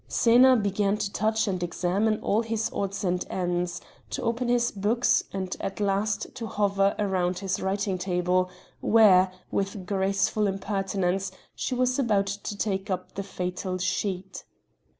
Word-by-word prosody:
Xena 245 +2 +5
began 200 0 +1
to 200 -1 -3
touch 220 +1 +1
and 185 -3 -1
examine 185 +5 0
all 215 +3 +2
his 225 -1 -2
odds 195 0 -3
and 180 -1 0
ends, 175 -1 -2 0.3
to - - -4
open 235 +1 -1
his 240 0 +2
books, 215 +5 +2
and 190 -1 -3
at 195 - -4
last 205 +1 0
to 235 -3 -5
hover 200 -1 +1
round 185 -3 0
his 190 0 -2
writing 195 0 -1
table 180 0 +1 0.3
where, 190 -4 +5 0.2
with 195 -1 -2
graceful 195 +2 +1
impertinence, 195 -1 -1 0.2
she 255 - -3
was 255 +1 +1
about 210 -6 +2
to 200 +1 -5
take 195 -1 -2
up 185 - -3
the 200 - -3
fatal 185 -1 -4
sheet. 185 0 -2
195 Hz, 150 wpm, -27 LUFS, 185-215 Hz, 0.3 s, Xena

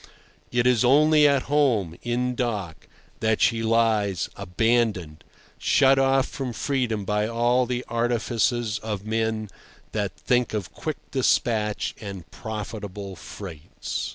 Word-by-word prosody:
It 120 0 +1
is 125 -3 +4
only 150 +3 +5
at 140 -2 +2
home, 125 - +1
in 125 +1 -1
dock, 105 -9 -3 0.3
that 110 -1 +1
she 115 -1 +2
lies 110 -5 +1
abandoned, 105 -5 0 0.4
shut 135 -1 +4
off 135 0 +3
from 135 -4 -5
freedom 120 -7 -1
by 105 +1 0
all 120 +2 +2
the 125 0 -2
artifices 120 -1 0
of 105 -2 -5
men 110 0 -1 0.4
that - - -2
think 125 -3 +1
of 100 -4 -4
quick 155 -2 -4
despatch 110 -5 +1
and 100 -5 -7
profitable 105 -3 -6
freights. 85 -2 -6
115 Hz, 125 wpm, -25 LUFS, 105-125 Hz, 0.4 s, only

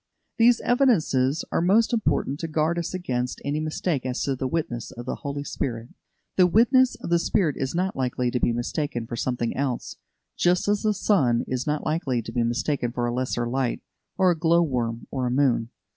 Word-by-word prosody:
These 235 +1 +5
evidences 165 - +2
are - - +1
most 215 +7 +3
important 155 - 0
to 165 - -3
guard 160 +2 0
us 170 0 -3
against 125 -9 -3
any 145 +2 -1
mistake 155 -1 -2
as 125 -1 -2
to 135 - 0
the 130 +1 -2
witness 130 -6 -3
of 120 -2 -9
the 130 - -3
Holy 140 -1 -4
Spirit. 120 -4 -4 0.5
The 180 -1 +6
witness 250 +6 +4
of - - -7
the 170 - +4
Spirit 170 -4 +1
is 135 +3 -3
not 185 +2 0
likely 125 -1 -1
to 125 - 0
be 120 - +2
mistaken 120 +1 -2
for 120 - -5
something 120 -1 -2
else, 135 -3 -3 0.4
just 180 +2 +2
as 205 0 +2
the 215 -1 +1
sun 135 - +2
is 130 +3 -3
not 150 0 -1
likely 145 -7 -1
to - - -7
be 120 - 0
mistaken 120 +2 -1
for 120 0 -2
a 120 - -1
lesser 125 -1 -1
light, 130 0 -1 0.4
a 185 -2 +5
glow 170 +1 +3
worm 120 -6 -2
or 130 -2 -1
a - - 0
moon. 125 -3 +2
140 Hz, 200 wpm, -25 LUFS, 125-170 Hz, 0.5 s, The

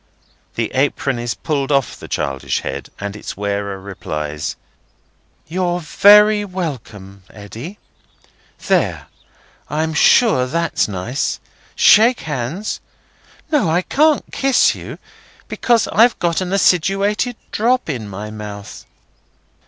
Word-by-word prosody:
The - - -2
apron 135 -1 0
is 120 -2 -3
pulled 145 +2 -2
off 135 -4 +1
the - - -11
childish 65 -1 -2
head, 70 +1 -6
as 100 0 -5
its 105 - -7
wearer 100 -1 -3
replies: 75 -6 -5 0.9
"You're 175 +1 -1
very 210 +5 +5
welcome, 120 - -6
Eddy. 115 - -9 0.9
There! - - +1 0.6
I'm 160 +1 -1
sure 155 - +4
that's 165 +4 0
nice. 105 +7 -3 0.4
Shake 230 +4 +5
hands. 150 - -4 0.7
No, 295 - +2
I 175 +3 +1
can't 305 +5 +2
kiss 270 -2 +3
you, - - -9 0.5
because 235 -3 +1
I've 230 +3 +4
got 170 +1 0
an 185 -1 -3
acidulated 195 +5 +2 0.2
drop 250 +4 +1
in 120 -9 -4
my 105 +2 -7
mouth." 105 -1 -9
150 Hz, 115 wpm, -18 LUFS, -, 0.9 s, very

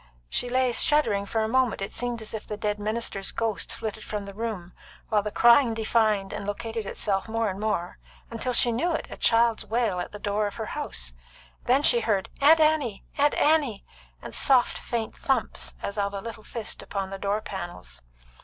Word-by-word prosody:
She 245 - -1
lay 255 0 +2
shuddering 230 -7 +2
a 220 -1 +1
moment; 255 -1 +2
it 195 - -5
seemed 240 -2 -2
as 215 - -5
if 220 - -6
the 210 - -4
dead 210 0 -1
minister's 210 -2 -1
ghost 225 -3 -1
flitted 220 0 -5
from 210 -1 -4
the 200 - -8
room, 205 -5 -5 0.4
while 215 -2 +3
the 210 - -3
crying 235 +2 +5
defined 215 -3 +1
and 200 - -5
located 225 +1 -4
itself 195 +1 -1
more 225 -2 0
and 190 - -7
more, 205 -5 -2 0.4
till 255 - -1
she 240 0 +4
knew 330 +10 0
it 320 - -2
a - - -5
child's 230 -1 +3
wail 225 -5 0
at 175 - -4
the 210 - -7
door 205 0 0
of 205 - -7
her - - -4
house. - - -2 0.5
Then 265 +4 +3
she 240 - +6
heard, 210 -4 0
"Aunt 315 +3 +7
Annie! 305 -9 +2
Aunt 290 +1 +4
Annie!" 295 -9 +2 0.4
and - - -8
soft, 255 -3 +3
faint 230 -2 -3
thumps 265 -4 -1
as 200 +1 -3
of 200 0 -1
a - - -2
little 225 +2 -7
fist 225 -1 -5
upon 195 -1 -4
the 195 - -5
door 200 +2 0
panels. 175 -4 -7
220 Hz, 195 wpm, -26 LUFS, 200-240 Hz, 0.5 s, Aunt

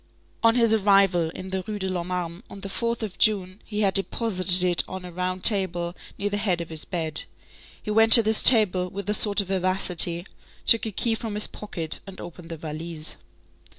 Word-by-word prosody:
On 230 0 +2
his 230 -2 +1
arrival 195 -5 +1
in 185 +3 -11
the 190 0 -4
Rue 215 -1 -6
de 190 -2 -5
l'Homme 180 -2 -5
Armé, 180 -1 -6
on 195 - -12
the 195 - -7
4th 235 +2 -4
of 205 -4 -8
June, 200 -3 0
he 210 -1 -5
had 195 -2 0
deposited 185 -3 +4
it 175 -1 0
on 190 -1 -9
a 180 - -10
round 185 +1 -6
table 175 -4 +3 0.2
near 205 0 -4
the 205 - -3
head 195 -4 -1
of 170 - -8
his 160 -2 -5
bed. 160 -4 -3 0.6
He 210 - -6
went 225 +1 +2
to 230 - +10
this 220 0 +1
table 190 -7 +4
with 200 +1 -9
a - - -1
sort 205 -1 +1
of 195 - -11
vivacity, 180 -2 +1 0.4
took 230 -1 +4
a - - -6
key 225 +3 -2
from 225 -1 -6
his 210 - +1
pocket, 165 -6 -6
and 195 - -12
opened 175 -1 -12
the 165 - -8
valise. 155 +1 -3
190 Hz, 210 wpm, -22 LUFS, 175-210 Hz, 0.6 s, to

